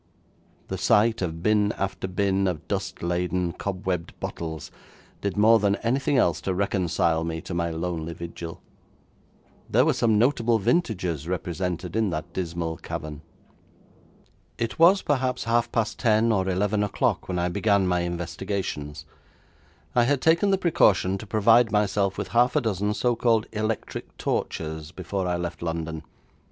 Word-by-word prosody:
The 95 - -3
sight 110 +4 +3
of 85 -2 -3
bin 105 0 +3
after 95 0 -3
bin 95 +1 +1
of 90 -5 -3
dust 95 -3 -3
laden, 90 0 -1
cobwebbed 90 -3 -4
bottles, 80 -2 -5 0.5
did 100 0 -2
more 110 +2 +6
than 100 -1 +2
anything 135 +4 +1
else 85 -9 +2
to 95 - -2
reconcile 90 -4 +1
me 80 0 -3
to - - -7
my 85 -1 0
lonely 85 0 -3
vigil. 85 +1 -8 1.1
There 125 +5 +4
were 155 - +3
some 115 -4 +2
notable 120 -1 +3
vintages 95 - 0
represented 90 0 -3
in 110 -2 +2
that 80 +1 -5
dismal 85 -2 -3
cavern. 75 -1 -6 1.4
It 115 +4 -3
was 185 +4 +6
perhaps 130 -3 0
half 115 +1 +1
past 115 -2 -1
ten 115 -1 +3
or 95 -3 +1
eleven 100 +3 +1
o'clock 105 -1 0
when 90 - -2
I 90 0 +1
began 100 +1 +2
my 90 -1 +1
investigations. 85 -3 -4 0.9
I 120 -1 +4
had 140 +2 +2
taken 165 +7 +3
the 195 - +3
precaution 100 - +3
to 110 - -9
provide 115 +2 +4
myself 100 -2 +1
with - - -4
half 120 +3 +3
a 150 - +3
dozen 105 -2 -1
so 120 +1 +1
called 115 -2 +2
electric 110 0 -4
torches 80 -1 -3
before 95 +1 -3
I 90 0 0
left 85 0 -5
London. 80 -1 -3
95 Hz, 150 wpm, -25 LUFS, 85-110 Hz, 1.4 s, more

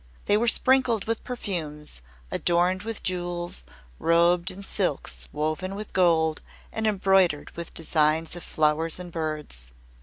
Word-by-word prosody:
They 205 - +3
were 230 +3 +2
sprinkled 250 -3 +3
with 225 0 -2
perfumes, 155 - -4 0.3
adorned 175 +2 +2
with 225 0 -5
jewels, 175 - -2 0.3
robed 170 +2 +4
in 195 +1 -6
silks 185 -7 -2
woven 155 +6 -2
with 210 +1 -7
gold 160 -3 +3 0.3
and 220 0 0
embroidered 190 -6 +3
with 170 0 -7
designs 160 0 +1
of 175 - -6
flowers 155 +1 +1
and 180 -1 -7
birds. 155 - -4
175 Hz, 130 wpm, -26 LUFS, 155-195 Hz, 0.3 s, robed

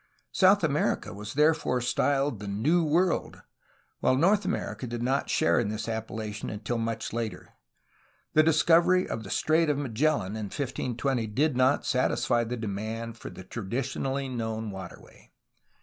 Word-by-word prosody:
South - - +4
America - - 0
was 105 +4 -7
therefore 150 -4 +3
styled 135 0 0
the 105 - -7
''New 140 - +2
World," 175 +3 +1 0.6
while 130 - +3
North 195 +7 +3
America 185 -8 -3
did 120 0 -4
not 135 +3 0
share 155 - +3
in 115 -4 0
this 110 0 -3
appella 110 -1 -4
tion 105 - -5
until 115 +3 -3
much 115 -1 -3
later. 115 -2 -4 0.8
The 155 - +6
discovery 165 +3 +4
of 110 - -4
the 100 - -9
Strait 160 - +2
of 145 - +1
Ma 145 -3 -3
gellan 115 -4 +1
in 110 -1 -4
1520 130 -2 -2
did 140 +7 +1
not 130 +2 +3
satisfy 125 -2 +1
the 120 +2 -4
demand 110 +2 -4
for - - -7
the 95 - -10
traditionally 130 +6 -3
known 110 -3 -3
waterway. 95 -3 -11
120 Hz, 155 wpm, -28 LUFS, 110-145 Hz, 0.8 s, The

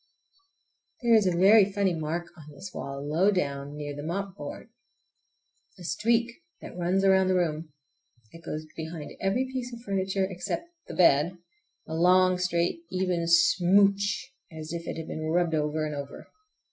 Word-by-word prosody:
There 235 -1 +4
is 215 -4 +5
a 175 -2 +1
very 200 +2 +6
funny 195 -2 +1
mark 165 +2 -4
on 155 -3 -13
this 185 +6 -10
wall, 140 +1 -6
low 170 +7 +3
down, 140 -6 -2
near 145 -1 -5
the 145 - -6
mopboard. 180 +2 -5 1.1
A 180 - -12
streak 235 +6 0 0.2
that - - -10
runs 180 +2 +1
round 190 -1 +4
the 185 - +2
room. 160 -3 -1 0.6
It 165 - -14
goes 155 -1 -5
behind 160 -1 -6
every 200 +7 +1
piece 250 -1 -4
of 235 -1 -9
furniture, 195 -2 -1
except 190 - -5 0.2
the - - -7
bed, 170 +1 +4 0.5
a 160 - -6
long, 180 +2 +4
straight, 175 - 0
even 180 -2 -1
smooch, 195 +6 +3 0.2
as 155 0 -7
if 170 0 -5
it - - -4
had 160 - -6
been 155 - -5
rubbed 170 0 +1
over 155 0 0
and 150 - -4
over. 140 -1 -7
175 Hz, 160 wpm, -27 LUFS, 155-195 Hz, 1.1 s, very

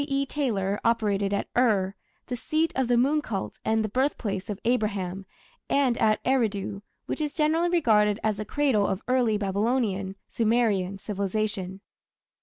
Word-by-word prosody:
E. 275 -1 0
Taylor 210 -9 -1
operated 205 -4 +1
at 200 - -1
Ur, 205 -6 +2 0.3
the 250 - -3
seat 310 +7 0
of 265 -2 +1
the 240 0 +3
moon 285 +5 +3
cult 205 -9 -5
and 220 0 +1
the - - -1
birthplace 225 -4 -1
of 205 -1 -4
Abraham, 200 -6 -1 0.4
and 270 -4 +3
at 215 -1 +3
Eridu, 210 -6 0 0.2
which - - -3
is 300 -1 -2
generally 320 +2 +2
regarded 215 - +3
as 215 -2 +1
the 215 - -3
cradle 250 -5 +2
of 190 +1 -2
early 250 -4 +2
Babylonian 200 -1 0
(Sumerian) 215 -5 +1
civilization. 200 -1 -3
215 Hz, 150 wpm, -26 LUFS, 200-255 Hz, 0.4 s, the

